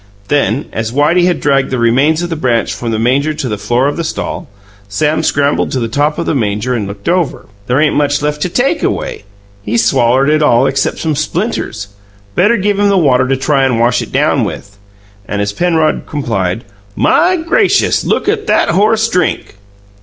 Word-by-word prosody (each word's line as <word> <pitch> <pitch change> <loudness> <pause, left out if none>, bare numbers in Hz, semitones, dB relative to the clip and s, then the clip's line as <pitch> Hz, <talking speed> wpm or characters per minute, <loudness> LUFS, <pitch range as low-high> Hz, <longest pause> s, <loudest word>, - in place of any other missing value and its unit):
Then, 140 -2 +1
as 115 0 -3
Whitey 150 +7 +2
had 180 - 0
dragged 135 -2 +1
the 130 - -2
remains 135 +8 +2
of 175 - -4
the - - -1
branch 125 -6 0
from 120 - -5
the 110 - -1
manger 135 +7 +1
to 135 - -3
the 105 - -2
floor 120 +5 +1
of 145 - -2
the 170 - -2
stall, 160 - -4 0.4
Sam 150 +10 0
scrambled 145 -2 0
to 130 - 0
the 115 - -2
top 145 +6 0
of 170 - -2
the - - 0
manger 110 -1 -1
and 110 -5 -2
looked 100 0 -9
over. 175 -3 0 0.2
"There 125 +3 +1
ain't 155 0 +2
much 145 -1 +1
left 150 0 -2
to 180 - 0
TAKE 275 - 0
away! - - -3 0.4
He's 115 +3 0
swallered 125 +5 +2
it 155 0 +2
all 130 -4 +3
except 135 0 0
some 155 -2 -2
splinters. 155 - -3 0.4
Better 210 - +3
give 205 0 0
him 205 0 +3
the 200 - +2
water 130 -6 +3
to 135 0 0
try 135 +1 +1
and 125 -3 +1
wash 120 +1 +2
it - - -7
down - - +1
with." 100 0 -6 0.5
And, 100 - -3
as 100 0 -1
Penrod 160 +1 0
complied, 115 -8 -2 0.3
"My 365 +2 +3
gracious, 370 +5 +1
look - - -1
at 425 0 -1
that - - +2
horse 220 +3 +2
DRINK!" 180 - -1
145 Hz, 200 wpm, -13 LUFS, 120-170 Hz, 0.5 s, all